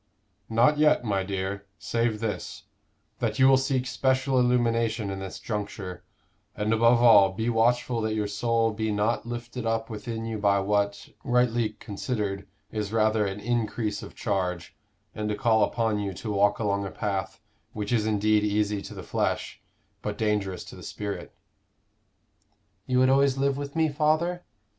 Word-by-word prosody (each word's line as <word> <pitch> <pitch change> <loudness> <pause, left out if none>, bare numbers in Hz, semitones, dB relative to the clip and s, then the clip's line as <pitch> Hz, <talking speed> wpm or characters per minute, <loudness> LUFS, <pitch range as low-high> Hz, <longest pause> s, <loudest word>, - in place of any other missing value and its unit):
"Not 120 +7 +3
yet, 150 -4 +4
my 100 -4 0
dear 100 +1 -4
save 115 -1 -1
this; 110 -2 -4 0.6
that - - -1
you 130 -1 +6
will 135 - +7
seek 135 -1 0
special 130 0 +1
illumination 115 -3 +1
in 95 - -5
this 95 -1 -6
juncture, 100 -4 -5 0.5
and, 105 +1 0
above 115 +1 +4
all, 100 -5 +7
be 110 +4 -1
watchful 120 +1 +2
that 110 0 -1
your 105 -1 0
soul 115 +2 +1
be 110 0 -2
not 105 +3 0
lifted 120 +1 -5
up 115 0 -1
within 110 +1 -5
you 110 -1 -3
by 100 -1 +3
what, 100 +1 0
rightly 120 -3 +1
considered, 105 -2 -4 0.2
is 105 -2 -3
rather 110 -1 +2
an 95 +1 -4
increase 110 -2 -1
of - - -10
charge, 90 -5 -2 0.4
and 105 0 -3
a 105 - 0
call 110 -2 +3
upon 110 -3 0
you 100 -2 -3
to 110 - -5
walk 100 0 +3
along 100 -2 0
a 100 - -4
path 95 0 -3 0.3
which 105 +2 -3
is 110 -2 +2
indeed 105 0 +2
easy 105 -1 0
to - - -9
the - - -7
flesh, - - -2 0.4
but 105 -1 -4
dangerous 105 -4 -1
to - - -11
the - - -11
spirit." 100 -1 -5 1.6
"You 125 - +1
would 130 0 +5
always 135 0 +3
live 140 0 +1
with 140 +1 -6
me, 160 -1 +3
father?" 155 +4 0
110 Hz, 165 wpm, -27 LUFS, 100-120 Hz, 1.6 s, will